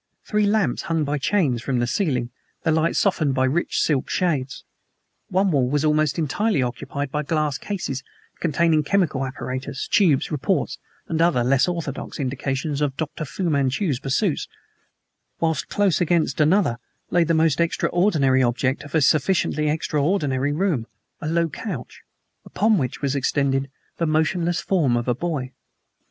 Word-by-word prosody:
Three 210 -1 +1
lamps 200 - +1
hung 165 -2 +1
by 145 0 -1
chains 140 - +1
from 130 0 -1
the 120 - +1
ceiling, 125 -5 -1 0.3
their 160 - +2
light 160 +1 +1
softened 155 -9 +1
by 130 0 +2
rich 150 +7 0
silk 140 -5 +1
shades. 145 -7 -1 0.6
One 190 +1 +1
wall 130 -5 +2
was 145 +2 +1
almost 155 0 +2
entirely 165 - +1
occupied 135 +3 -4
by 150 - -1
glass 150 -2 -1
cases 175 -10 -4 0.4
containing 165 -1 +2
chemical 155 -4 +1
apparatus, 130 0 -5
tubes, 175 -10 +3
retorts 150 -3 -1 0.3
and 165 0 -1
other 160 -8 +3
less 130 +5 +3
orthodox 170 -6 -4
indications 140 +2 -2
of 140 -3 -1
Dr. 155 0 -4
Fu 185 - -5
Manchu's 140 - +1
pursuits, 140 +5 0 0.9
whilst 160 -2 -1
close 200 -4 +1
against 165 -4 +1
another 155 - +3 0.3
lay 175 - +4
the 165 0 +1
most 160 -2 +2
extraordinary 165 -5 +2
object 130 +3 0
of 145 +1 -7
a 160 - +4
sufficiently 150 +1 +2
extraordinary 145 -2 0
room 150 - 0 0.3
a 155 - -3
low 170 +1 +2
couch, 205 +6 -7 0.4
upon 215 -2 +2
which 130 +1 -3
was 140 0 0
extended 135 0 0 0.3
the 165 - 0
motionless 165 +2 +1
form 150 -11 +1
of 120 - -3
a 125 - +3
boy. 135 -2 -3
150 Hz, 150 wpm, -23 LUFS, 135-170 Hz, 0.9 s, lay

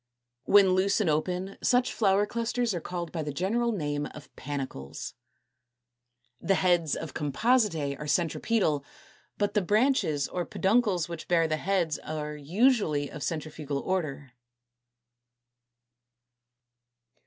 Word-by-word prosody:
When 200 -2 +6
loose 190 +3 +2
and 190 -7 +2
open 180 +5 -2
such 250 0 +2
flower 200 -1 +3
clusters 235 +1 -1
are 175 - -3
called 175 -1 -5
by 165 - -3
the 150 -1 -3
general 225 +10 0
name 145 -7 -2
of 150 - -13
Panicles. 135 - -6 1.3
The 195 - +2
heads 175 -4 +2
of 160 -4 -6
Compositæ 165 - +1
are 150 - -6
centripetal; 165 -1 +1 0.5
but 205 -1 0
the 210 - +2
branches 205 - +2
or 180 - -3
peduncles 195 -3 +1
which 170 -1 -7
bear 165 -2 +3
the 155 0 0
heads 175 -2 0
are 150 -1 -5
usually 155 - +1
of 150 - -8
centrifugal 155 -3 -3
order. 145 -5 -3
175 Hz, 120 wpm, -28 LUFS, 150-205 Hz, 1.3 s, When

